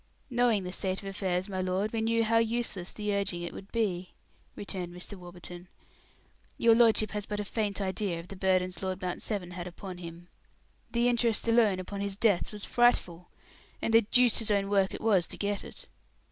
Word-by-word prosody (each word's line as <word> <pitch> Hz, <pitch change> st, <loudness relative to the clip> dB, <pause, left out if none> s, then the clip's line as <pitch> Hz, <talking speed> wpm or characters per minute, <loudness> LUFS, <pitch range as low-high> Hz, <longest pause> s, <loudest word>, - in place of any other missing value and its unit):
"Knowing 240 Hz, -5 st, +3 dB
the 180 Hz, -, -5 dB
state 190 Hz, -1 st, -1 dB
of -, -, -5 dB
his 195 Hz, 0 st, -5 dB
affairs, 185 Hz, -1 st, -1 dB
my 190 Hz, -2 st, -3 dB
lord, 185 Hz, +4 st, -1 dB
we 225 Hz, -, 0 dB
knew 230 Hz, +1 st, +2 dB
how 230 Hz, +1 st, +3 dB
useless 230 Hz, -5 st, 0 dB
the 210 Hz, -1 st, -2 dB
urging 195 Hz, -3 st, -1 dB
it 175 Hz, -, -5 dB
would 195 Hz, -, -10 dB
be," 190 Hz, -6 st, -1 dB, 0.4 s
returned 185 Hz, -3 st, -5 dB
Mr. 180 Hz, +3 st, -7 dB
Warburton. 175 Hz, -1 st, -10 dB, 0.9 s
"Your 230 Hz, -1 st, +6 dB
lordship 225 Hz, -2 st, +4 dB
has 210 Hz, -1 st, -3 dB
but 210 Hz, 0 st, -3 dB
a 210 Hz, -, -2 dB
faint 210 Hz, -1 st, -2 dB
idea 190 Hz, -2 st, -1 dB
of 170 Hz, -, -10 dB
the 195 Hz, -, -7 dB
burdens 185 Hz, -2 st, +1 dB
Lord 185 Hz, -1 st, -2 dB
Mount 180 Hz, -1 st, -3 dB
Severn 195 Hz, -5 st, -3 dB
had 180 Hz, 0 st, -6 dB
upon 180 Hz, +1 st, -8 dB
him. 170 Hz, 0 st, -9 dB, 0.6 s
The 235 Hz, 0 st, +2 dB
interest 235 Hz, -2 st, +1 dB
alone 225 Hz, -5 st, +4 dB
upon 200 Hz, +2 st, -5 dB
his 200 Hz, -1 st, -3 dB
debts 210 Hz, -5 st, +2 dB
was 210 Hz, -1 st, -5 dB
frightful 180 Hz, -8 st, +2 dB, 0.5 s
and 225 Hz, -, -1 dB
the 225 Hz, -, +8 dB
deuce's 230 Hz, 0 st, +3 dB
own 200 Hz, -1 st, +1 dB
work 195 Hz, -1 st, +3 dB
it -, -, -8 dB
was 195 Hz, -6 st, +3 dB
to -, -, -8 dB
get 205 Hz, 0 st, -2 dB
it. -, -, -11 dB
200 Hz, 200 wpm, -30 LUFS, 180-220 Hz, 0.9 s, the